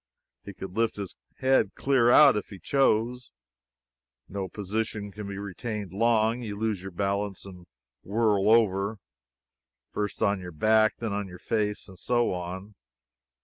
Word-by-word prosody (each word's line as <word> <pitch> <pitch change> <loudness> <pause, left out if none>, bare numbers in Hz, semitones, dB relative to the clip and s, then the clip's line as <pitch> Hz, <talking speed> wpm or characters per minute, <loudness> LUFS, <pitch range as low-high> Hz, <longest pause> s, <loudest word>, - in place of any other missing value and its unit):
He 100 - -9
could 95 0 -8
lift 115 0 +1
his 100 -2 -6 0.2
head 130 0 +2
clear 130 -4 +3
out, 140 0 +8
if 105 - -3
he 100 - -9
chose. 125 0 +1 1.0
No 95 -1 -4
position 105 0 -3
can 105 +1 -7
be 100 -1 -6
retained 100 0 -5
long; 115 +2 +2
you 105 -4 -5
lose 110 -3 -1
your 95 - -6
balance 100 +1 -2
and 90 -2 -12 0.3
whirl 105 -1 +2
over, 105 -2 +3 0.9
first 105 +1 -3
on 100 -2 +2
your 90 -2 -8
back 110 +6 +4
and 115 -2 -2
then - - -2
on 100 -1 -3
your 90 -1 -10
face, 105 +1 -2
and 95 -2 -13
so 120 +1 +1
on. 90 +3 -6
105 Hz, 155 wpm, -27 LUFS, 95-115 Hz, 1.0 s, out